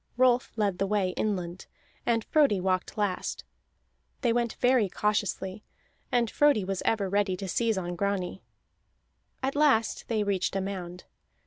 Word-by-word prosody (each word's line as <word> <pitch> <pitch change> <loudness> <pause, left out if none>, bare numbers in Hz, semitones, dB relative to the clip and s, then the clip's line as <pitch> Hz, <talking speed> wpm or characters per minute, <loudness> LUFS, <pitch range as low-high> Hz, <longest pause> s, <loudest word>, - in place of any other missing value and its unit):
Rolf 250 -1 +3
led 205 -5 0
the 195 - +1
way 200 -2 +1
inland, 180 -3 -3 0.4
and 230 -2 +2
Frodi 285 -11 +3
walked 185 +1 -1
last; 205 -3 -2 0.8
they 235 -3 +2
went 235 -1 0
very 245 -5 +3
cautiously, 205 0 -1 0.5
and 240 -2 +2
Frodi 285 -9 +3
was 195 -1 -2
ever 205 -3 +1
ready 200 -1 +1
to 195 - -5
seize 225 +3 +1
on 175 -1 -3
Grani. 190 0 -2 1.0
At 270 +1 0
last 280 -7 +2
they 220 -2 0
reached 195 -2 -1
a 195 - +1
mound. 185 -2 -5
205 Hz, 145 wpm, -28 LUFS, 190-230 Hz, 1.0 s, Rolf